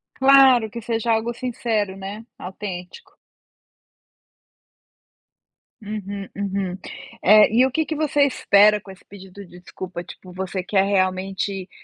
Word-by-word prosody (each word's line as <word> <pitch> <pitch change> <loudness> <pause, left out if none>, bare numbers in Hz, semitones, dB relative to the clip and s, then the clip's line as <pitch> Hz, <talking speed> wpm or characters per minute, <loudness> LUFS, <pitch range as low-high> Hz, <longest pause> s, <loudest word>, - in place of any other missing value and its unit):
Claro 265 -4 +5
que 235 - -7
seja 230 0 -1
algo 225 +2 -1
sincero, 225 -5 -2
né, 200 +3 -8
autêntico. 185 - -8 2.7
Uhum, 200 -2 -6
uhum. 195 -2 -3 0.5
É, 210 +2 +7
e 240 +4 +4
o 265 - -1
que 315 +2 0
que 310 - -4
você 290 -1 +1
espera 210 -6 +4
com 195 - -12
esse 190 - -17
pedido 195 0 -12
de 180 0 -15
desculpa? 180 -1 -8
Tipo, 180 +1 -13
você 185 0 -4
quer 195 +1 +1
realmente, 190 0 -1
200 Hz, 125 wpm, -22 LUFS, 190-230 Hz, 2.7 s, É